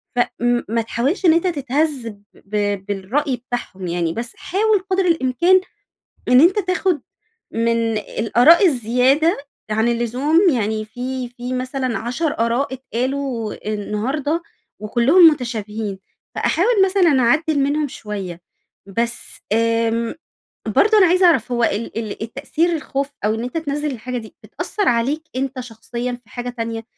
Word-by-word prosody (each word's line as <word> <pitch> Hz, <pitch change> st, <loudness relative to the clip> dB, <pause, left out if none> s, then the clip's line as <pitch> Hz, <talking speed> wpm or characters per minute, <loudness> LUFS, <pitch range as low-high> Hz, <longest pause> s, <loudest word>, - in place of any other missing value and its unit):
ف -, -, 0 dB, 0.2 s
م 240 Hz, 0 st, +2 dB
ما 230 Hz, +1 st, +1 dB
تحاولش 250 Hz, -, -1 dB
إن 330 Hz, -, +7 dB
أنتَ 335 Hz, +3 st, +2 dB
تتهز 285 Hz, -4 st, -1 dB
ب -, -, -4 dB, 0.2 s
ب 205 Hz, -1 st, -2 dB
بالرأي 215 Hz, +8 st, -1 dB
بتاعهم 240 Hz, -6 st, -6 dB
يعني. 170 Hz, -1 st, -1 dB
بس 235 Hz, +4 st, -5 dB
حاول 420 Hz, +2 st, +1 dB
قدر 380 Hz, 0 st, +2 dB
الإمكان 335 Hz, +3 st, +3 dB, 0.7 s
إن 250 Hz, +1 st, +7 dB
أنتَ 350 Hz, +7 st, +5 dB
تاخد 365 Hz, -3 st, 0 dB, 0.5 s
من 230 Hz, -1 st, +1 dB
الآراء 245 Hz, -, +4 dB
الزيادة 260 Hz, +4 st, +2 dB, 0.3 s
عن 220 Hz, +2 st, +2 dB
اللزوم 245 Hz, +7 st, +1 dB
يعني 220 Hz, -4 st, -1 dB
في 250 Hz, +3 st, -5 dB
في 245 Hz, +1 st, -7 dB
مثلًا 255 Hz, -1 st, -2 dB
10 270 Hz, +7 st, -2 dB
آراء 240 Hz, +4 st, 0 dB
اتقالوا 255 Hz, -2 st, -3 dB, 0.2 s
النهارده 265 Hz, +10 st, -2 dB, 0.4 s
وكلهم 255 Hz, -, +6 dB
متشابهين، 220 Hz, -6 st, -4 dB, 0.4 s
فاحاول 380 Hz, +8 st, +1 dB
مثلًا 365 Hz, -8 st, +3 dB
أعدل 300 Hz, +5 st, +2 dB
منهم 290 Hz, +2 st, +1 dB
شوية. 195 Hz, -8 st, -6 dB, 0.5 s
بس 235 Hz, +4 st, -3 dB
آمم، 230 Hz, +1 st, +1 dB, 0.5 s
برضو 435 Hz, +1 st, +4 dB
أنا 380 Hz, -3 st, +6 dB
عايزة 365 Hz, +2 st, +4 dB
أعرف 265 Hz, -9 st, +3 dB
هو 240 Hz, -1 st, +1 dB
ال 225 Hz, +1 st, -1 dB
ال 220 Hz, -1 st, -4 dB
التأثير 280 Hz, +8 st, -1 dB
الخوف 280 Hz, -3 st, -3 dB, 0.2 s
أو 215 Hz, -, +2 dB
إن 225 Hz, -, -4 dB
أنتَ 250 Hz, +6 st, -4 dB
تنزل 295 Hz, -1 st, -2 dB
الحاجة 250 Hz, 0 st, -5 dB
دي، 220 Hz, -2 st, -9 dB
بتأثر 410 Hz, -3 st, -3 dB
عليك 265 Hz, +7 st, 0 dB
أنتَ 265 Hz, 0 st, -2 dB
شخصيًا 240 Hz, +1 st, -5 dB
في 220 Hz, -, -27 dB
حاجة 245 Hz, +2 st, -5 dB
تانية؟ 230 Hz, -2 st, -4 dB
250 Hz, 140 wpm, -20 LUFS, 230-300 Hz, 0.7 s, إن